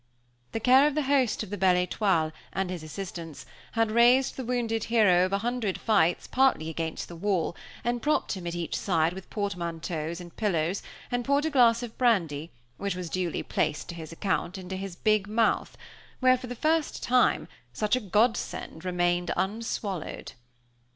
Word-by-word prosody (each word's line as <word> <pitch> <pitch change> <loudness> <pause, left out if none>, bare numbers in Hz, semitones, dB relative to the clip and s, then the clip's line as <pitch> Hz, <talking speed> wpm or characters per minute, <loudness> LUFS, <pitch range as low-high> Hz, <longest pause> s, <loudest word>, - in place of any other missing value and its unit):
The - - -2
care 260 +5 +6
of 295 - -1
the 305 - +1
host 265 -5 +2
of - - -9
the 205 - -4
Belle 185 -1 +5
Étoile, 175 -5 +1 0.2
and 190 -1 -1
his 180 -3 -5
assistants, 165 -1 -7 0.3
had 225 -1 +1
raised 245 +3 +4
the 260 - -4
wounded 230 -2 -1
hero 205 -6 +4
of - - -10
a 200 - +2
hundred 230 -2 -2
fights 195 -6 +2
partly 260 -12 +2
against 160 0 -4
the 170 - -9
wall, 175 -2 0 0.3
and 240 0 -1
propped 300 +1 +1
him 185 -4 -4
at 170 - -3
each 170 -1 -3
side 165 -3 +1
with 190 0 -10
portmanteaus 170 -4 -3
and 175 -2 -11
pillows, 180 -3 0 0.3
and 245 0 0
poured 280 +3 +2
a 320 - 0
glass 240 -3 +4
of 230 -2 -8
brandy, 170 - +1 0.3
which 200 -2 -2
was 180 -2 -5
duly 180 -3 -1
placed 150 - -1
to - - -4
his 160 -1 -8
account, 185 +1 -2
into 190 0 -6
his 190 -1 -5
big 215 +1 +2
mouth, 225 +2 +1 0.4
where, 255 0 +5
for 255 0 -7
the 245 - -5
first 315 +4 0
time, 250 0 +3 0.2
such 210 +2 +1
a - - 0
godsend 210 -5 0
remained 175 -1 0
unswallowed. 200 -3 -3
200 Hz, 180 wpm, -28 LUFS, 175-240 Hz, 0.4 s, care